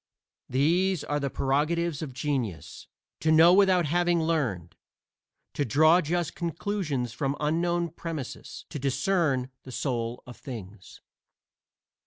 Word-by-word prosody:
These 170 +6 +2
are 145 0 -1
the 140 -1 -2
prerogatives 150 +4 0
of 150 -4 -5
genius: 125 - -4 0.3
To 160 - +1
know 165 +2 +7
without 190 -3 +4
having 175 +2 +2
learned; 125 - -1 0.8
to 145 - 0
draw 155 - +5
just 170 +1 -1
conclusions 165 - -3
from 140 +1 -2
unknown 170 +3 0
premises; 160 -5 -7
to 150 - -5
discern 135 -1 0
the 130 - -11
soul 120 -2 -3
of 125 - -11
things. 105 -6 -10
150 Hz, 120 wpm, -27 LUFS, 130-170 Hz, 0.8 s, know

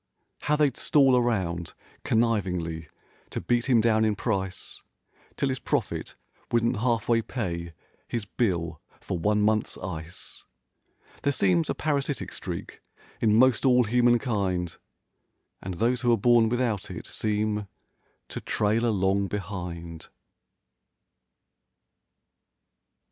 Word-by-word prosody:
How 150 - +1
they'd 145 -4 +2
stall 135 -3 +4
around, 95 -9 0 0.3
connivingly, 90 -8 0 0.4
to - - -3
beat 120 +1 0
him 120 -3 +5
down 110 -1 +3
in 110 -1 +2
price, 95 -5 -3 0.5
'Till 140 - 0
his 130 -1 -2
profit - - -2 0.4
wouldn't 115 -1 +2
half 115 -1 0
way 115 -1 +3
pay 85 -9 -4 0.3
his 115 -3 -3
bill 90 -7 -1 0.2
for 90 - -4
one 105 +3 +2
month's 110 0 +1
ice. 85 -2 -8 0.8
There 140 - +2
seems 90 -10 +2
a - - 0
parasitic 145 -2 -1
streak, - - -6 0.4
in 105 -2 +3
most 130 +1 +4
all 125 -2 +5
human¬ 120 +2 +3
kind— 95 -8 -1 0.9
And 95 -1 -5
those 120 +6 +1
who're 120 -2 +3
born 115 +1 +4
without 120 -4 -1
it - - -7
seem 105 -1 -1 0.6
to - - -5
trail 110 +3 +1
along 100 -2 +1
behind. 90 -4 -6
110 Hz, 115 wpm, -27 LUFS, 95-120 Hz, 0.9 s, him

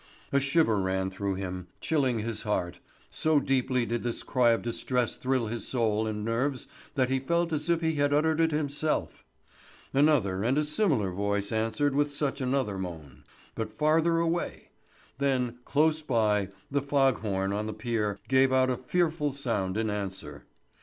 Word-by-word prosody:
A 140 - +4
shiver 140 -6 +2
ran 95 0 -1
through 95 0 -2
him, 90 -1 -5
chilling 135 -7 +1
his 110 -1 -3
heart; 90 -5 -2 0.3
so 155 -2 +3
deeply 130 -2 +1
did 120 0 -2
this 120 -1 -3
cry 125 -2 +3
of 115 - +2
distress 120 +1 -1
thrill 130 -2 0
his 115 +1 -4
soul 110 -3 +1
and 105 -1 -3
nerves 130 +4 -1 0.3
that 130 -2 +1
he 135 - +2
felt 170 +5 0
as 155 +2 -1
if 170 -1 +2
he 160 -1 +1
had 145 0 +2
uttered 155 +2 +2
it 165 0 +4
himself. 150 0 -1 0.7
Another 135 -10 +3
and 125 +5 +2
a 150 - +2
similar 150 - +1
voice 100 +1 -1
answered 115 +6 0
with 145 +1 +1
such 140 -1 -1
another 125 -6 0
moan, 80 -7 -8 0.3
but 110 -1 -5
farther 160 +2 +3
away; 170 +1 -2 0.5
then, 125 -3 0
close 155 +2 +2
by, 105 - +1 0.2
the 140 0 +1
fog 135 -3 +2
horn 95 -2 -1
on 105 +1 -2
the - - -3
pier 110 -2 -2
gave 130 0 +4
out 130 0 +3
a 125 - -1
fearful 155 +2 0
sound 110 -8 -2
in 110 -1 0
answer. 100 -2 -5
125 Hz, 170 wpm, -28 LUFS, 105-145 Hz, 0.7 s, A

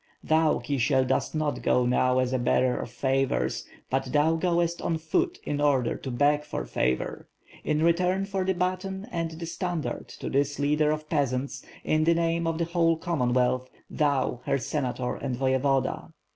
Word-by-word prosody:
"Thou, 160 0 +3
Kisiel, 130 +1 +1
dost 130 +4 0
not 155 -1 -1
go 125 - +2
now 125 +1 +2
as 130 0 +1
a 130 - +1
bearer 125 +1 +2
of - - -5
favors; 135 +2 0 0.2
but 135 +1 +1
thou 150 +5 +2
goest 170 0 0
on 165 - 0
foot 345 - 0
in 145 0 -2
order 135 -5 +2
to 135 - -6
beg 145 +4 +2
for 150 - -4
favor, 65 +1 -1 0.4
in 155 +1 +1
return 180 +3 +2
for 195 -1 -2
the 190 0 0
baton 185 +3 -2
and 165 -3 -2
the 165 +1 -7
standard, 170 -1 -3
to - - -8
this 140 +1 +1
leader 150 +1 +2
of 155 0 -2
peasants, 135 -2 -1 0.2
in 155 0 +2
the 170 0 +4
name 165 0 0
of 165 -1 -1
the 170 - 0
whole 165 -1 +2
Commonwealth 130 -6 0
• - - -38 0.2
thou, 140 -5 0
her 140 -1 +1
Senator 130 -2 -2
and 130 -3 -3
voyevoda. 130 +1 0
150 Hz, 175 wpm, -27 LUFS, 130-165 Hz, 0.4 s, the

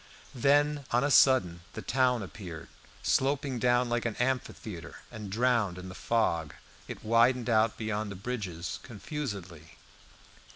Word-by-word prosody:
Then 145 +3 +3
on 120 +2 +2
a 145 - +1
sudden 95 -13 +5
the - - -6
town 125 -3 +2
appeared. 85 -2 -8 0.3
Sloping 135 -1 +1
down 120 +1 +3
like 120 0 0
an 115 -2 -2
amphitheatre, 120 -7 -3 0.2
and 105 -3 -7
drowned 115 -5 +1
in 90 0 -8
the - - -8
fog, 90 -9 0 0.3
it - - -8
widened 120 +2 +3
out 110 0 +3
beyond 110 -1 -2
the 100 - -6
bridges 95 -5 -4
confusedly. 100 - -7
115 Hz, 135 wpm, -30 LUFS, 95-125 Hz, 0.3 s, sudden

